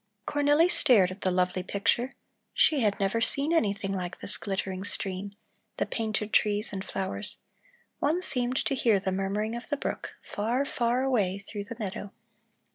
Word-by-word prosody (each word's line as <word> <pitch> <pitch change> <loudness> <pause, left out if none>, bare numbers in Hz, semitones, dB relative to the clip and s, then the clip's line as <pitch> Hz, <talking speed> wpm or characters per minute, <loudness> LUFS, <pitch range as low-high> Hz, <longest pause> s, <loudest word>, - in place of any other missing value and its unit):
Cornelli 290 +3 +4
stared 210 - +4
at 185 - -9
the 185 - +2
lovely 180 0 +1
picture; 205 +7 0 0.4
she 300 - +4
had 210 -5 +1
never 200 +3 +1
seen 285 +7 +1
anything 200 -9 +1
like 180 -1 -3
this 200 - -3
glittering 190 -1 -3
stream, 195 0 -3 0.4
the - - +1
painted 215 -2 -2
trees 210 0 +3
and 190 -1 -3
flowers; 195 +2 -3 0.6
one 310 +5 +2
seemed 250 -5 0
to - - +1
hear 230 -6 +3
the 190 0 -2
murmuring 200 +4 -1
of 235 - -7
the 290 - 0
brook, - - -4
far, 235 +7 -1
far 245 -1 +1
away 210 -8 +1
through 200 0 -7
the 230 +3 -8
meadow. 200 -2 -5
210 Hz, 165 wpm, -28 LUFS, 195-245 Hz, 0.6 s, Cornelli